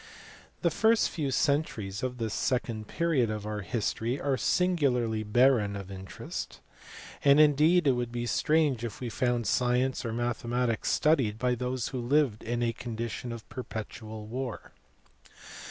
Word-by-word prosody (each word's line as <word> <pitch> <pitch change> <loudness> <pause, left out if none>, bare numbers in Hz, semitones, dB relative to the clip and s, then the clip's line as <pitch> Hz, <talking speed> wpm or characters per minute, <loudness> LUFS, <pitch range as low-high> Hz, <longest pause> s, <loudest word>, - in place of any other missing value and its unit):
THE 170 - +3
first 220 +4 +3
few 150 -4 -2
centuries 130 -8 0
of 130 -1 -3
this 110 -3 -2
second 115 -4 -1
period 160 -9 +1
of 105 -1 -4
our 105 0 -3
history 115 +5 -2
are 140 -1 0
singularly 130 -11 +1
barren 110 -1 +3
of 100 -1 -7
interest; 95 0 -7 0.6
and 140 +1 +6
indeed 155 +3 +5
it 140 - +5
would 120 -1 -2
be 120 0 -3
strange 150 -2 +2
if 115 -3 -5
we 125 - -4
found 120 -1 0
science 125 +2 +1
or 115 - -3
mathematics 120 0 -1
studied 135 -9 +2
by 125 +1 +1
those 125 0 -2
who 130 -2 -4
lived 130 -3 +2
in 120 +1 -2
a 115 -1 +1
condition 115 0 -5
of 115 -1 -8
perpetual 110 -2 -7
war. 125 +1 -5
120 Hz, 150 wpm, -29 LUFS, 110-135 Hz, 0.6 s, and